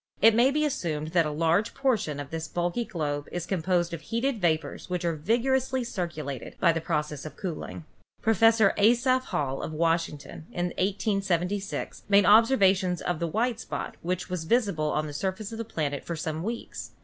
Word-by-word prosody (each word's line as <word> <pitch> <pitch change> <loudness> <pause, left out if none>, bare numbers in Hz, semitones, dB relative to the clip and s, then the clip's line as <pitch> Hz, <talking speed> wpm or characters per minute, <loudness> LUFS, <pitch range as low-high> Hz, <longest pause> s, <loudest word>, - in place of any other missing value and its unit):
It 225 +1 +7
may 240 +4 +5
be 305 +2 +1
assumed 155 - -2
that 165 -1 +2
a - - -2
large 165 +8 +1
proportion 225 - 0
of 145 -1 -7
this 160 0 -4
bulky 175 +8 -1
globe 145 -5 -3
is 175 -1 -3
composed 175 -1 0
of 165 - -5
heated 230 - -1
vapors 160 -2 -1
which 180 -1 -2
are 170 - +1
vigorously 255 - +1
circulated 160 - -5
by 170 - +5
the 165 0 -2
process 150 -3 -2
of 155 -2 -9
cooling. 170 -3 -5 0.4
Professor 225 -1 +4
Asaph 245 +4 +3
Hall, 135 -2 -2
of 155 - -5
Washington, 165 -1 -1
in 175 0 -1
1876 195 -1 -1
made 200 -1 +6
ob 220 +2 +8
servations 190 -7 +2
of 175 -3 -1
the 170 - -1
white 225 +7 0
spot - - -5
which 180 +1 -2
was 180 -3 -4
visible 200 -7 +1
on 150 +1 0
the 150 - -6
sur 190 +6 -1
face 215 +3 -8
of 225 - -6
the - - -1
planet 150 -9 -3
for 170 - -4
some 160 0 -3
weeks. 230 +5 -5
180 Hz, 185 wpm, -27 LUFS, 160-220 Hz, 0.4 s, ob